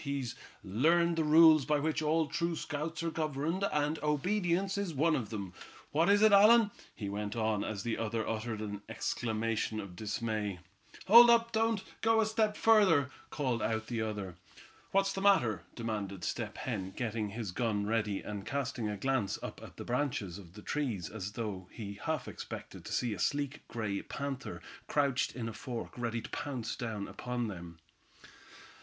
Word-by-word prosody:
He's 140 -4 -2 0.3
learned 165 - +3
the 165 - +1
rules 155 -1 +7
by 150 +2 +2
which 155 +2 0
all 155 +1 +2
true 170 +3 -1
scouts 155 +2 -4
are 165 - -1
governed, 155 +4 -1
and 150 +1 0
obedience 180 +5 +1
is 200 -6 -2
one 155 +3 +3
of 115 -5 -3
them. 100 -5 -5 0.4
What 165 +5 +3
is 205 +1 +5
it, 215 - +7
Allan?" 210 +2 +7 0.2
he 105 - -5
went 105 +1 -3
on, 110 -2 0
as 100 -3 -4
the 115 - -2
other 115 0 -1
uttered 110 0 -3
an 105 -1 -5
exclamation 110 -1 -1
of 100 -4 -7
dismay. 105 -1 -2 0.5
"Hold 235 +5 +10
up, 230 0 +5
don't 225 -2 +1 0.2
go 225 0 +4
a 220 - +4
step 215 -1 +1
further!" 185 -12 +5 0.2
called 130 -5 -1
out 110 0 -1
the 115 0 -2
other. 105 -5 -4 0.5
"What's 195 0 +2
the 195 - -3
matter?" 120 - +4
demanded 105 -5 -4
Step - - -3
Hen, 95 0 -3
getting 110 -3 -2
his 110 -2 -4
gun 105 -1 0
ready, 105 -2 0
and 105 -2 -5
casting 125 -4 -2
a 105 - -3
glance 130 -3 0
up - - -6
at - - -12
the - - -7
branches 120 -8 -1
of 90 -3 -13
the 105 +1 -11
trees 120 - -2
as 100 -2 -5
though 100 -5 -4
he 100 -3 -7
half 160 -2 -1
expected - - -8
to - - -7
see 120 -3 0
a 100 - -7
sleek 145 0 -1
gray 105 -4 -2
panther 135 -2 -5 0.2
crouched 140 -3 +1
in 120 -2 -3
a 115 - -5
fork, 120 +1 -6
ready 120 -1 -2
to - - -8
pounce 125 -6 -3
down 110 -4 -4
upon 120 -2 -3
them. 85 -3 -8
120 Hz, 175 wpm, -32 LUFS, 105-160 Hz, 0.5 s, Hold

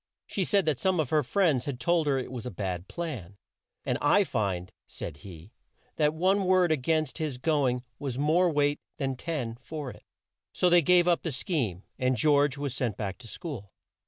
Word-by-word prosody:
She 190 - -1
said 200 0 +2
that 155 -5 +1
some 190 -2 +1
of 150 -5 0
her 155 -1 +4
friends 150 -3 +2
had 135 -4 -4
told 170 -1 +2
her 140 -2 +2
it 130 - -4
was 125 -2 -5
a - - -2
bad 90 -2 -4
plan, 125 - -6 0.5
and - - 0
"I 175 +8 +5
find," 95 - -2 0.2
said 75 -4 -7
he 85 +4 -12 0.5
"that 150 -1 +3
one 190 +4 +2
word 185 -2 +4
a - - +5
gainst 155 +3 0
his 150 -5 -2
go 145 0 +2
ing 125 0 -1 0.2
has 135 -4 -3
more 160 +6 +3
weight 145 -1 +1 0.2
than 135 -3 -1
ten 125 -6 -4
for 145 -1 -6
it." - - -14 0.5
So 180 - +2
they 175 0 +7
gave 175 +2 +5
up 175 -1 +3
the 165 - -3
scheme, 125 - -2 0.2
and 130 0 +1
George 145 +1 +3
was 140 -3 -3
sent 125 -5 -2
back 100 -3 -4
to 120 - -12
school. 125 - -7
145 Hz, 205 wpm, -28 LUFS, 120-165 Hz, 0.5 s, they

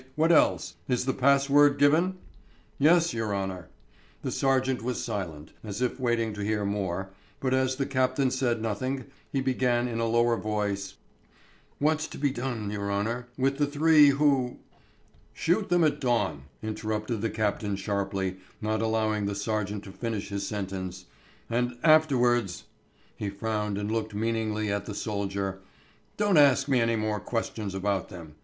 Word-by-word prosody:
What 160 +2 +3
else? 165 - +3
Is 125 -1 0
the 130 - +1
pass 140 +1 +3
word 145 0 +5
given?" 160 +6 +3 0.6
"Yes, 170 +3 +4
your 110 -3 -1
honour...." 95 -3 -4 0.5
The - - -2
sergeant 130 -1 +1
was 125 +1 -2
silent, 90 - -5
as 105 -1 -5
if 125 +1 -1
waiting 120 -3 0
to 105 0 -5
hear 105 0 0
more, 95 -2 -2 0.3
but 130 -1 0
as 130 0 +2
the 135 +1 -1
captain 130 0 +1
said 120 -4 0
nothing, 130 +4 -2 0.3
he 135 - 0
began 125 -2 +1
in 115 -1 -3
a 115 - +1
lower 120 0 +2
tone, 105 -1 0 1.0
"What's 155 +2 +1
to - - -9
be 140 -1 +1
done, 120 -5 -3
your 100 -1 -3
honour, 115 +5 -2
with 135 +1 +1
the 145 - +3
three 150 0 +6
who...." 140 -3 +2 0.8
"Shoot 185 +5 0
them 175 -1 +4
at 150 -2 +2
dawn," 120 - 0 0.2
interrupted 110 0 -3
the 115 - 0
captain 105 -1 -1
sharply, 100 -1 -2 0.2
not 110 0 -1
allowing 110 -2 0
the 100 - -2
sergeant 105 -1 -2
to 95 - -10
finish 110 -1 -4
his 100 0 -3
sentence, 95 -3 -5 0.4
"And 120 +1 -1
afterwards" 125 - +3 0.5
he 105 - -3
frowned 105 0 -2
and 105 +1 -2
looked 110 -2 -2
meaningly 110 -1 -1
at 100 0 -2
the 105 - -5
soldier 100 -2 -3 0.6
"don't 205 -4 +3
ask 140 -2 +5
me 130 -4 +3
any 115 0 +2
more 110 -1 -1
questions 110 -4 -3
about 95 -1 -1
them. 80 -4 -10
115 Hz, 160 wpm, -28 LUFS, 100-130 Hz, 1.0 s, three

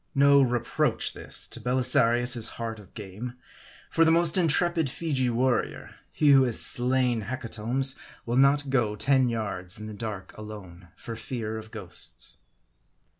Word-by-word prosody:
No 140 0 +5
reproach 120 -2 0
this, - - 0
to - - -4
Belisarius' 125 -2 +3
heart 115 -1 -5
of 100 - -17
game; 110 +4 -8 0.6
for 165 - +3
the 160 - +4
most 165 -1 +4
intrepid 170 -2 +2
Feegee 135 -4 -1
warrior, 125 +2 -1 0.2
he 150 - +2
who 135 -1 +7
has 120 -3 +2
slain 125 -2 +2
his 105 - -8
hecatombs, 125 +2 -1 0.3
will 120 0 -2
not 140 +1 +3
go 110 -6 +1
ten 130 +3 +2
yards 105 -4 -3
in 105 - -8
the 110 - -7
dark 105 -3 -7
alone, 100 -5 -11
for 115 - -8
fear 115 -2 -5
of 110 0 -12
ghosts. 105 -6 -3
120 Hz, 150 wpm, -26 LUFS, 110-135 Hz, 0.6 s, who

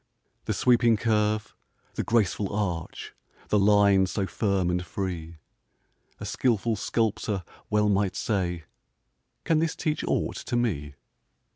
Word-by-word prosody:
The - - 0
sweeping 120 -2 +4
curve, 105 -1 0 0.4
the - - -2
graceful 105 -3 +1
arch, 95 -6 -3 0.4
The 105 - +3
line 100 -1 +5
so 95 +2 -1
firm 95 -3 0
and 90 0 -1
free; 85 -3 -5 0.8
A - - -6
skilful 115 -2 +1
sculptor 105 -2 -1 0.3
well 105 0 +2
might 100 -1 +1
say: 90 -5 -1 0.8
"Can 160 -2 +2
this 165 0 0
teach 155 -1 -2
aught - - -1
to - - -4
me?" 75 -13 -1
105 Hz, 125 wpm, -27 LUFS, 95-110 Hz, 0.8 s, line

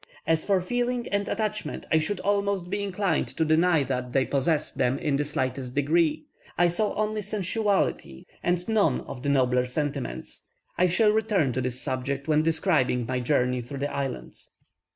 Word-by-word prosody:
As 160 -1 +2
for 195 -2 +2
feeling 245 +4 -1
and 200 0 -1
attachment, 215 -7 -3
I 160 - +5
should 180 +5 -2
almost 200 -3 0
be 205 0 -1
inclined 195 -4 0
to 160 - +2
deny 160 0 +3
that 125 -2 -3
they 135 -1 +3
possessed 150 +2 -1
them 125 +2 +2
in 150 -3 0
the 145 - +1
slightest 130 -3 -3
degree; 155 +2 +2 0.3
I 175 0 +4
saw 205 +5 0
only 215 0 -1
sensuality, 200 - -1 0.2
and 175 0 0
none 205 - +2
of 125 - -8
the 140 - -1
nobler 125 -2 +2
sentiments. 135 - -4 0.3
I 180 - +3
shall 210 +5 +4
return 210 - +1
to 130 - -1
this 125 0 -3
subject 135 +1 -3
when 155 -1 +3
describing 155 -7 +1
my 125 +1 -1
journey 125 -1 +1
through 125 +4 -8
the 145 +2 -3
island. 135 -3 -4
155 Hz, 175 wpm, -26 LUFS, 130-200 Hz, 0.3 s, I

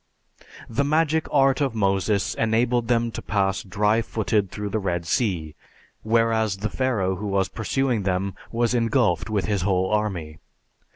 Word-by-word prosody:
The 115 +5 0
magic 155 +2 +1
art 135 0 +3
of 135 -5 0
Moses 100 0 +1
enabled 115 +1 +1
them 115 -1 +1
to - - -6
pass 95 -2 0
dry 105 +4 +1
footed 110 -3 -1
through 105 +2 -5
the 110 - -1
Red 90 -4 -2
Sea, 85 -7 -1 0.5
whereas 110 -2 +1
the 105 +2 -3
Pharaoh 105 -8 0
who 105 - -4
was 100 -1 0
pursuing 125 0 -1
them 95 0 -1 0.2
was 120 +1 +1
engulfed 115 - +1
with 105 -3 0
his 100 -3 0
whole 95 0 +1
army. 90 -8 -2
110 Hz, 155 wpm, -24 LUFS, 95-115 Hz, 0.5 s, art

